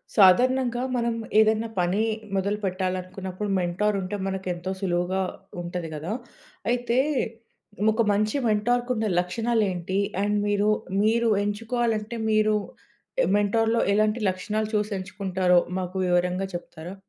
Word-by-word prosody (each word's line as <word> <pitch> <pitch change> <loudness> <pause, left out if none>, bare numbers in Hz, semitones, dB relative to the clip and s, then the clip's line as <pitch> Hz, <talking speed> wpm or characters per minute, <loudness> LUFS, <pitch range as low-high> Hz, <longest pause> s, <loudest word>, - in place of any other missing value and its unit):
సాధారణంగా 245 +5 +4
మనం 235 -1 0 0.2
ఏదైనా 220 +1 +3
పని 180 +5 +1 0.3
మొదలుపెట్టాలనుకున్నప్పుడు 190 0 -2
మెంటార్ 185 +4 0
ఉంటే 185 +3 -4
మనకు 190 -1 -4
ఎంతో 175 +2 -5
సులువుగా 180 0 0 0.4
ఉంటది 175 -1 -4
గదా! 160 +7 -4 0.6
అయితే 245 0 0 0.9
ఒక 230 +2 +2
మంచి 215 +5 +1
మెంటార్‌కున్న 230 +1 +1
లక్షణాలేంటి? 190 -2 0 0.2
అండ్ 205 +1 +1
మీరు 205 0 +2 0.3
మీరు 230 +2 +3
ఎంచుకోవాలంటే 225 +1 -1
మీరు 215 0 +3 0.8
మెంటార్‌లో 225 +3 +2
ఎలాంటి 215 +2 +2
లక్షణాలు 210 +4 -2
చూసి 210 0 0
ఎంచుకుంటారో 185 -2 +1 0.2
మాకు 185 0 -5
వివరంగా 180 +2 +1
చెప్తారా? 175 +1 -8
205 Hz, 105 wpm, -25 LUFS, 185-220 Hz, 0.9 s, సాధారణంగా